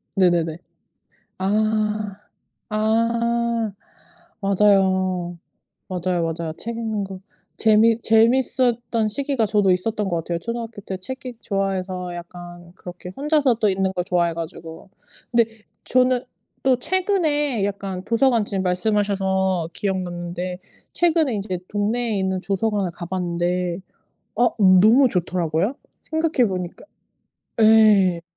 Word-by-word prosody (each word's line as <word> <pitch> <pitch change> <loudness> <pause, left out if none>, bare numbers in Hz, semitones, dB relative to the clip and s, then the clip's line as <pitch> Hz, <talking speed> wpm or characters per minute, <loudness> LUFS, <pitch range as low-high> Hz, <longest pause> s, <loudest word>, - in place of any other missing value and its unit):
네네네. 175 -4 +2 0.8
아. 210 0 0 0.5
아. 230 +1 0 0.7
맞아요, 190 -3 +2 0.5
맞아요, 180 -1 -1
맞아요. 160 -1 -5
책 230 0 -6
읽는 220 -3 -2
것 190 -1 -8 0.4
재미 225 +1 +4
재밌었던 235 0 +2
시기가 270 +1 -1
저도 205 -2 +2
있었던 210 +3 -1
것 175 -3 -1
같아요. 170 +1 -3
초등학교 230 0 -5
때 190 -1 -5
책 260 +8 -8
읽기 245 -3 -7
좋아해서 185 -2 -2
약간 175 0 -10
그렇게 180 -1 -9
혼자서 290 -3 +2
또 220 -2 +1
읽는 190 0 0
것 180 -2 -2
좋아해 175 -2 +1
가지고. 165 +1 -8 0.4
근데 235 -1 +4 0.4
저는 255 -1 +2 0.4
또 260 -1 +3
최근에 295 - +1
약간 195 -2 -4
도서관 230 0 +2
지금 195 -2 -2
말씀하셔서 190 -2 0
기억났는데 180 -1 -3 0.3
최근에 325 -6 +2
인제 195 -3 -3
동네에 215 +1 -1
있는 190 0 -1
도서관을 200 -1 -1
가 170 +1 -8
봤는데 175 0 -2 0.6
어 240 +1 +4
너무 215 +7 +6
좋더라구요. 180 - -1 0.4
생각해 315 -7 +2
보니까 180 -2 -5 0.8
예. 210 -5 +5
200 Hz, 260 characters per minute, -22 LUFS, 180-230 Hz, 0.8 s, 너무